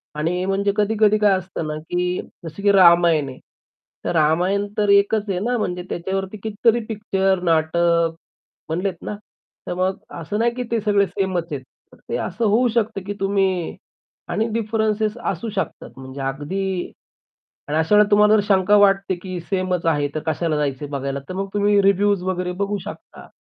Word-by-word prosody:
आणि 175 +4 -1
म्हणजे 195 +1 +1
कधी-कधी 215 0 +3
काय 210 -2 +4
असतं 180 -3 -5
ना, 150 - -3
की 180 +3 -2 0.2
जसं 165 +5 -8
की 205 - +5
रामायण 170 -6 +5
आहे. 130 - -10 0.7
तर - - 0
रामायण 180 +6 +2
तर 210 -1 +1
एकच 205 +1 +3
आहे 185 -2 0
ना 245 +5 0
म्हणजे 180 -5 -2
त्याच्यावरती 190 +3 -3
कितीतरी 220 +3 +1
पिक्चर, 195 -4 0
नाटक 165 0 +2 0.5
बनलेत 180 +3 -1
ना? 210 - -4 0.5
तर - - -2
मग 185 +1 0 0.2
असं 205 +7 -3
नाही 235 +1 +2
की 250 - -3
ते 230 -2 +1
सगळे 205 -1 +3
सेमच 185 -4 -2
आहेत. 135 - -4 0.3
तर - - -16
ते - - -1
असं 205 +6 -2
होऊ 225 +4 +3
शकतं, 225 -2 -1
की 205 - -2
तुम्ही 195 -3 0 0.5
आणि 225 - 0
डिफरन्सेस 220 -1 0
असू 195 +5 -5
शकतात 195 - -4
म्हणजे 130 +1 -8
अगदी 175 +8 -3 0.8
आणि 150 - 0
अशा 160 +6 +2
वेळेला 210 0 +5
तुम्हाला 210 +1 +5
जर 210 - +3
शंका 195 +1 +4
वाटते 195 -1 +3
की 185 -2 -5
सेमच 185 -1 -2
आहे 145 -3 +2
तर 155 - -2
कशाला 160 0 0
जायचंय 145 -1 -2
बघायला. 140 -1 -3
तर 185 - -5
मग 195 +1 -3
तुम्ही 205 0 +3
रिव्ह्यूज 200 0 +3
वगैरे 180 -1 -2
बघू 205 +1 -1
शकता. - - -10
190 Hz, 170 wpm, -21 LUFS, 170-205 Hz, 0.8 s, की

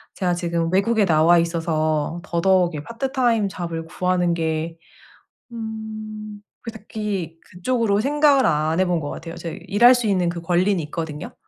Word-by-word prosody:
제가 180 -3 0
지금 170 -1 -1
외국에 215 +2 +3
나와 165 0 +5
있어서 165 -1 -1
더더욱 175 0 +2
이 - - -3
part 230 - -4
time 235 -5 +2
job을 170 -3 -5
구하는 180 0 0
게 160 0 -2 0.7
음 215 -2 -7 0.2
그닥히 210 -6 -5
그쪽으로 205 +2 -1
생각을 285 0 +3
안 155 +2 +1
해 185 - +4
본 175 -2 0
것 145 -2 -5
같아요. 165 0 -7
제 165 -2 -6
이 - - -12
일할 240 +5 +6
수 245 -1 -1
있는 185 -4 +1
그 170 0 -5
권리는 180 +3 +1
있거든요. 150 -1 -6
180 Hz, 340 characters per minute, -22 LUFS, 165-215 Hz, 0.7 s, 일할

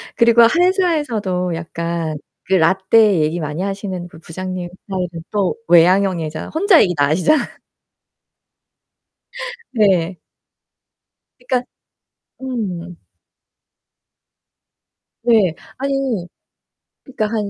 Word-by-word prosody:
그리고 235 0 +5
회사에서도 255 - +1
약간 165 -1 -4 0.3
그 190 - -2
라떼 190 +3 +4
얘기 155 +3 0
많이 150 +3 -4
하시는 195 -2 -4
그 160 -2 -15
부장님 185 +1 -6 0.2
스타일은 180 -4 -4
또 200 -3 0
외향형이죠. 175 -2 +3
혼자 370 +1 +5
얘기 180 -3 +2
다 145 -1 +2
하시잖아. 185 - +1 2.1
네. 190 -6 +2 1.2
그니깐 250 0 -1 0.8
음. 180 -9 -5 2.2
네. 220 -8 +3 0.2
아니 270 -8 -1 0.8
그러니까 235 -6 -3
한 210 -2 -2
190 Hz, 190 characters per minute, -18 LUFS, 170-235 Hz, 2.2 s, 그리고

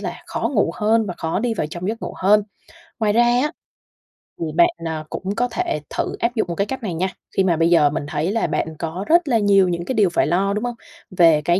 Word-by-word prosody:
là - - -6
khó - - -2
ngủ 205 -5 +2
hơn 220 +1 +2
và 180 - -4
khó 160 +2 -1
đi 230 +1 -1
vào 150 - -2
trong 175 +4 -5
giấc 225 +2 -4
ngủ - - -5
hơn. 205 +2 +4 0.6
Ngoài 210 -2 +2
ra 240 +2 +4
á, 245 +5 +2 0.9
thì 165 - -2
bạn, 175 - +6 0.2
à, 160 -1 -3
cũng 195 +2 -4
có 245 +1 +1
thể 360 - -1
thử - - -2
áp 240 +1 0
dụng 220 - 0
một 170 - -4
cái 200 - 0
cách 265 0 -5
này 185 -5 -3
nha, 185 +4 0 0.3
khi 195 - +4
mà 170 -4 +2
bây 165 +1 +3
giờ 155 -4 +5
mình 145 0 -3
thấy 155 +4 -1
là 225 - 0
bạn 160 0 -2
có 175 +4 -4
rất 340 0 +4
là 240 -4 +3
nhiều 200 -2 +4
những 170 0 -3
cái 260 - -2
điều 205 -4 +4
phải 170 - +1
lo, 195 +5 +1
đúng 210 - -2
hông? 245 -1 -3 0.4
Về 165 -3 +6
cái 175 +2 +3
195 Hz, 260 wpm, -21 LUFS, 170-225 Hz, 0.9 s, bạn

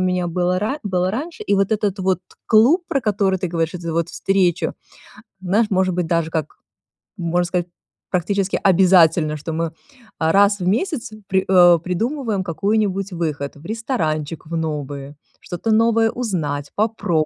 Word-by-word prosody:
меня 180 -1 0
было 180 +1 0
ра 220 +9 -2
было 185 -1 0
раньше. 305 - -5
И 200 - +2
вот 195 +1 +1
этот 205 -2 -1
вот 185 -1 +1 0.3
клуб, 245 - +5
про 275 - 0
который 200 -3 +1
ты 185 - -2
говоришь, 165 0 -1
это 170 -2 -4
вот 165 0 0
встречу, 190 -3 +1 0.7
знаешь, 205 +4 +1
может 185 -2 +1
быть, 175 -1 -1
даже 165 -1 0
как 160 -3 -3 0.6
можно 175 +1 0
сказать, 175 0 -2 0.4
практически 195 +2 0
обязательно, 175 -4 +4
что 155 +3 -6
мы, 165 0 -2 0.5
а, 160 0 +2
раз 200 +2 +5
в - - -9
один 180 +2 +2
месяц 255 - -2 0.2
при 190 -1 +1
э 175 -2 +7
придумываем 220 - -2
какую-нибудь 195 +2 -1
выход. 150 -5 -3
В 160 - -16
ресторанчик 165 - -2
в 170 - -4
новый, 145 -3 -4 0.3
что-то 180 +6 -3
новое 225 0 +3
узнать, 150 - -3
попроб 205 -7 0
185 Hz, 160 wpm, -20 LUFS, 165-210 Hz, 0.7 s, э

